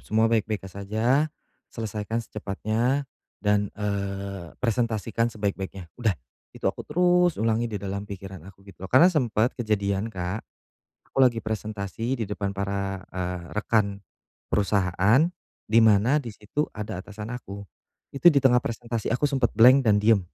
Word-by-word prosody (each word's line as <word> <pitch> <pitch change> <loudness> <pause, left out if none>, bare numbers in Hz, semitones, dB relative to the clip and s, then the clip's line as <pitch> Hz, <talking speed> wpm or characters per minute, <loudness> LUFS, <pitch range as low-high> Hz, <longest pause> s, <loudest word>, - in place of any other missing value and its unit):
semua 110 +1 +1
baik-baik 110 -2 0
saja, 110 - 0 0.4
selesaikan 110 +1 -3
secepatnya 110 +7 -1 0.4
dan, 105 -1 +2
eee, 100 -3 -4
presentasikan 115 -1 0
sebaik-baiknya." 95 -5 -4
Udah 110 -6 +1 0.4
itu - - -13
aku - - 0
terus 180 +1 +3
ulangi 115 +1 +1
di 105 - -4
dalam 100 +1 -5
pikiran 95 -2 -8
aku, 95 0 -17
gitu, 100 -2 -15
loh. - - -37
Karena 135 +8 +7
sempet 120 -5 +1
kejadian, 105 -3 -1
Kak, 95 0 -4 0.7
aku - - -5
lagi 120 -4 +4
presentasi 110 +3 -3
di - - 0
depan 100 -1 -3
para, 100 -1 -3
eee, 90 -1 -3 0.2
rekan 100 -2 +1 0.5
perusahaan, 100 - +3 0.5
di 115 - +7
mana 110 +7 +4
di 120 - -7
situ 105 +9 -3
ada 105 -3 -4
atasan 105 +3 -8
aku, 100 -5 -7 0.5
itu 140 +5 +5
di 150 - +4
tengah 125 -2 +5
presentasi 115 -2 -4
aku 125 +5 0
sempet 135 -4 +2
blank 125 +4 +8
dan 105 - +5
diem. 105 -1 +4
110 Hz, 145 wpm, -26 LUFS, 100-120 Hz, 0.7 s, blank